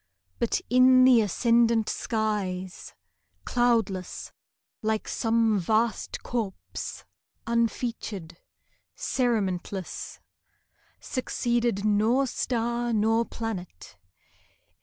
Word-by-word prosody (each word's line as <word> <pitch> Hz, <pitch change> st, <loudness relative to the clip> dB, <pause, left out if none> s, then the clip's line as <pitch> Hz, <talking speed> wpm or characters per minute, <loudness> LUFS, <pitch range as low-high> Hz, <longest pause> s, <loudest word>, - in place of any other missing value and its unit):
But 235 Hz, -, +1 dB
in 255 Hz, +1 st, +6 dB
the 255 Hz, -3 st, +7 dB
ascendant 230 Hz, +2 st, +3 dB
skies 200 Hz, -5 st, -3 dB, 0.5 s
(Cloudless, 230 Hz, -7 st, 0 dB, 0.5 s
like 220 Hz, 0 st, -1 dB
some 225 Hz, -2 st, +2 dB
vast 220 Hz, +5 st, 0 dB
corpse 225 Hz, -6 st, -5 dB, 0.4 s
Unfeatured, 230 Hz, -6 st, -2 dB, 0.6 s
cerementless) 195 Hz, -6 st, -2 dB, 0.8 s
Succeeded 240 Hz, -5 st, -1 dB
nor 220 Hz, +6 st, +3 dB
star 240 Hz, -1 st, -1 dB
nor 225 Hz, +2 st, +2 dB
planet. 200 Hz, -, -6 dB
225 Hz, 70 wpm, -27 LUFS, 205-240 Hz, 0.8 s, the